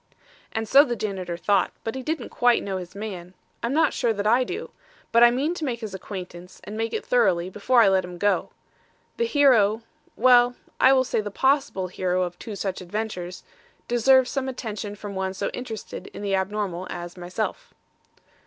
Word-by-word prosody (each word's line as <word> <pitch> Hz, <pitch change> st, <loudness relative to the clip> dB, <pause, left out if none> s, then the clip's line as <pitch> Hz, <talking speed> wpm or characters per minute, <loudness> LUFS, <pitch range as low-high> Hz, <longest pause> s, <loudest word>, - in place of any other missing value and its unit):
"And 220 Hz, 0 st, -3 dB
so 275 Hz, +6 st, +8 dB
the 245 Hz, -5 st, -2 dB
janitor 190 Hz, -5 st, -4 dB
thought, 195 Hz, +1 st, +2 dB
but 225 Hz, -, -3 dB
he 265 Hz, -, -5 dB
didn't 295 Hz, -2 st, -3 dB
quite 245 Hz, -1 st, +3 dB
know 195 Hz, -1 st, -3 dB
his 180 Hz, 0 st, -8 dB
man. 190 Hz, -4 st, -7 dB, 0.3 s
I'm 235 Hz, -, -1 dB
not 315 Hz, +4 st, +3 dB
sure 235 Hz, -3 st, +1 dB
that 205 Hz, -1 st, -3 dB
I 235 Hz, +4 st, +4 dB
do. -, -, -6 dB, 0.4 s
But 235 Hz, +1 st, +6 dB
I 240 Hz, -, +9 dB
mean 275 Hz, +7 st, 0 dB
to 340 Hz, -, -6 dB
make 245 Hz, -5 st, -2 dB
his 215 Hz, -3 st, -6 dB
acquaintance 180 Hz, -2 st, -8 dB
and 210 Hz, -, -7 dB
make 225 Hz, 0 st, -2 dB
it -, -, -3 dB
thoroughly 190 Hz, -7 st, +2 dB
before 235 Hz, +5 st, +3 dB
I -, -, +5 dB
let 190 Hz, -1 st, +3 dB
him 180 Hz, 0 st, -8 dB
go. 205 Hz, +3 st, +1 dB, 0.7 s
The 470 Hz, -, +1 dB
hero 235 Hz, -, +4 dB, 0.3 s
well, 245 Hz, 0 st, +5 dB, 0.2 s
I 260 Hz, -, +6 dB
will 265 Hz, -1 st, +5 dB
say 245 Hz, -3 st, -1 dB
the 205 Hz, -, -5 dB
possible 265 Hz, -3 st, +1 dB
hero 185 Hz, 0 st, -1 dB
of 175 Hz, 0 st, -5 dB
two 215 Hz, -, -7 dB
such 195 Hz, -1 st, -3 dB
adventures 180 Hz, -2 st, -5 dB, 0.4 s
deserves 255 Hz, +2 st, +4 dB
some 265 Hz, -1 st, -2 dB
attention 210 Hz, -5 st, -5 dB
from 205 Hz, -1 st, -7 dB
one 190 Hz, 0 st, -3 dB
so -, -, -2 dB
interested 225 Hz, -4 st, -7 dB
in -, -, -9 dB
the 200 Hz, -1 st, -1 dB
abnormal 190 Hz, -2 st, -2 dB
as 175 Hz, 0 st, -6 dB
myself." 180 Hz, +4 st, -4 dB
210 Hz, 190 wpm, -25 LUFS, 185-245 Hz, 0.7 s, I